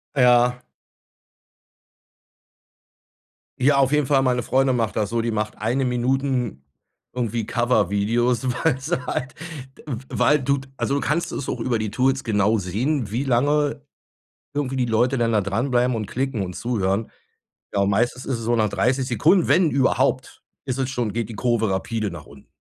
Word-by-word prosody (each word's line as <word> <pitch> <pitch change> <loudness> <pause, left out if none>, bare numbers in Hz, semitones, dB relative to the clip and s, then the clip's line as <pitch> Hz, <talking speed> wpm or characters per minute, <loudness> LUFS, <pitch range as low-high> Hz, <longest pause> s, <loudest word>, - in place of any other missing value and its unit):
Ja. 125 -1 +4 3.0
Ja, 140 +2 +4
auf 135 -1 +3
jeden 150 -3 +2
Fall, 135 -2 +3
meine 125 -2 +1
Freundin 135 -1 +2
macht 115 -3 -1
das 105 -2 0
so, 115 0 0
die 115 0 -1
macht 105 0 -3
Eine-Minuten 125 - -1 0.5
irgendwie 120 -3 -2
Cover-Videos, 120 +2 +1 0.2
weil 140 -5 +2
sie 135 -2 -3
halt, 130 0 -3 0.4
d - - -16
w 130 -5 -4
weil 150 0 +3
du 140 +1 +1 0.2
Also 140 - 0
du 140 - 0
kannst 170 +3 -1
es 135 - -4
auch 120 - -3
über 120 0 0
die 110 -2 -3
Tools 135 +4 +1
genau 105 0 +2
sehen, 110 - -1
wie 125 +5 -1
lange 145 +3 +1 0.7
irgendwie 135 -2 -2
die 125 - +1
Leute 120 +3 +1
dann 115 -1 +1
da 105 - +3
dranbleiben 120 +5 0
und 110 -2 -3
klicken 130 -3 -2
und 90 -1 -5
zuhören. 110 -3 -1 0.6
Ja, 100 - +1
und 100 - +2
meistens 120 +5 0
ist 130 -4 -2
es 115 - -6
so 120 0 +2
nach 110 -2 +2
30 130 +4 +1
Sekunden, 155 - +3
wenn 175 -4 +4
überhaupt 135 -1 +1 0.2
ist 130 -1 -2
es 130 - 0
schon 120 -5 -2
geht 115 0 -2
die - - -6
Kurve 115 -2 +1
rapide 105 +2 -2
nach 85 -4 -9
unten. 70 -1 -16
125 Hz, 170 wpm, -23 LUFS, 110-135 Hz, 3.0 s, Ja